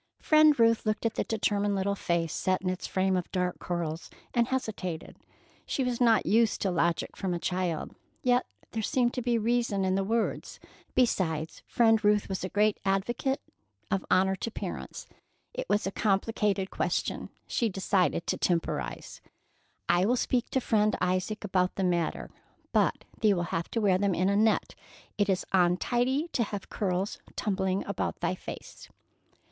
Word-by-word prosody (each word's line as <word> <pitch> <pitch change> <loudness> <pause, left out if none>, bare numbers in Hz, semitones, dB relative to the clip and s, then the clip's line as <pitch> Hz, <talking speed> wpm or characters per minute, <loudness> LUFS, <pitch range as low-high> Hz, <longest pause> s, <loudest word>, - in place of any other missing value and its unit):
Friend 310 -3 +5
Ruth 230 -1 +4
looked 215 +1 -1
at 230 - +1
the - - -1
determined 205 -2 0
little 195 +1 0
face 170 -4 -1
set 185 0 0
in 185 - +1
its 185 - -5
frame 190 0 +1
of 180 -1 -2
dark 180 -1 -1
curls, 170 -2 -3 0.2
and 235 -1 +2
hesitated. 205 -10 -3 0.5
She 270 - 0
was 250 -1 -2
not 230 -2 +4
used 225 0 +3
to 195 - +1
logic 170 -1 0
from 185 -3 -2
a - - -3
child, 180 -3 -2 0.3
yet 250 0 +3 0.2
there 225 - -2
seemed 240 +2 +1
to 250 - -2
be 240 -1 +1
reason 230 -3 +1
in 185 - +1
the 195 +1 +1
words. 225 +3 -2 0.4
Besides, 165 -10 0
Friend 225 -2 +3
Ruth 210 0 +3
was 190 -2 -3
a 185 - -2
great 210 +1 +2
advocate 215 +8 0 0.5
of 195 - +1
honor 190 +1 +3
to 230 - -3
parents. - - -6 0.5
It - - -5
was 210 - +2
a 195 - -1
complicated 200 -1 0
question. - - -2 0.2
She 230 - 0
decided 190 -3 +1
to - - -1
temporize. 115 - -2 0.7
"I 175 +2 +3
will 245 - +3
speak 245 0 0
to 265 - +1
Friend 215 -2 +2
Isaac 185 +4 -1
about 185 -2 +1
the 195 - -1
matter, 175 -3 -1 0.4
but - - +2
thee 210 -3 +4
will 175 - -1
have 165 0 -2
to 230 - -1
wear 190 -3 +3
them 200 -2 +1
in 185 +3 +2
a 200 - +2
net. 220 +1 +2 0.5
It 205 0 +2
is 185 -1 +1
untidy 240 - +2
to 260 - -1
have 205 -3 -3
curls 190 0 -1 0.2
tumbling 190 -2 -1
about - - -3
thy - - +1
face." - - -9
200 Hz, 170 wpm, -29 LUFS, 185-230 Hz, 0.7 s, Friend